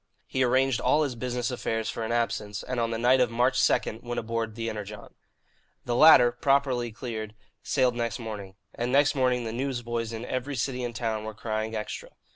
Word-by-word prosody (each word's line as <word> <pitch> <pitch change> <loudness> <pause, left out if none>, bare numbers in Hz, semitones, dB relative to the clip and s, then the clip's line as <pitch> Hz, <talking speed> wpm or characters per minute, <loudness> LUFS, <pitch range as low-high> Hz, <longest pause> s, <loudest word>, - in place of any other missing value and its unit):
He 130 - -2
arranged 130 0 +2
all 155 - +3
his 140 -4 -2
business 125 +1 -2
affairs 115 -3 -2
for - - -4
an 110 - -2
absence, 110 -3 -1
and 125 -1 -3
on 115 -1 +1
the 115 - -2
night 125 +3 +4
of 125 -2 +3
March 125 +2 +2
2 110 - +1
went 120 0 -5
on - - -2
board 115 -1 -2
the 115 0 -3
Energon. 105 -1 -7 0.7
The 120 - -1
latter, 125 -4 +8
properly 125 -1 +1
cleared, 110 -2 -6 0.3
sailed 125 -1 +2
next 115 -4 -2
morning. 105 -4 -7 0.2
And 120 +1 -2
next 145 +2 +4
morning 125 -3 +1
the 110 -1 -4
newsboys 120 -3 -2
in 115 +1 -5
every 130 +3 -3
city 125 +1 -2
and 120 -1 -4
town 110 -2 -2
were 110 0 -6
crying 110 0 -3
"Extra." 105 -1 -5
120 Hz, 200 wpm, -27 LUFS, 110-125 Hz, 0.7 s, latter